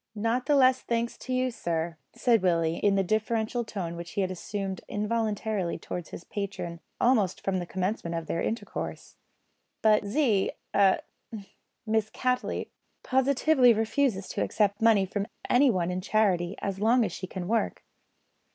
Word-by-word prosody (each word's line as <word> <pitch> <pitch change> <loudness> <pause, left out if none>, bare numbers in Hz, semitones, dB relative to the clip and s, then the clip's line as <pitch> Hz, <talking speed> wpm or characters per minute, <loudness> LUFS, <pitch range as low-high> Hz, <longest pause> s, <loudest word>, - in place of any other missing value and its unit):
"Not 230 +4 0
the 295 - +4
less 260 -1 +5
thanks 235 0 -1
to 255 - -7
you, 255 0 +1
sir," 170 -5 -2 0.2
said 235 -4 +3
Willie, 165 -3 +1
in 200 -1 +2
the 195 - +2
deferential 220 +4 0
tone 185 -6 -5
which 170 0 -8
he 200 - 0
had 185 -1 -1
assumed 190 +1 -4
involuntarily 210 -3 -1
towards 175 -2 -6
his - - -8
patron 195 -4 -5 0.2
almost 220 -7 +2
from 190 -1 0
the 175 - -5
commencement 185 -2 -2
of 165 -1 -3
their 170 - -2
intercourse; 230 - -4 0.7
"but 215 -1 +5
Z 210 -2 +1 0.2
a 195 -2 +4 0.8
Miss 220 -1 +1
Cattley 250 -1 -1 0.3
positively 265 0 +4
refuses 225 -2 0
to - - -3
accept 205 -2 +1
of - - -25
money 220 -4 +5
from 200 +1 -3 0.2
anyone 225 -10 +3
in 180 +1 -2
charity, 190 -3 +1
as 195 -1 -2
long 230 +3 +4
as 190 - -3
she 185 +1 -6
can 180 -1 -5
work." 225 +2 0
210 Hz, 160 wpm, -28 LUFS, 185-230 Hz, 0.8 s, less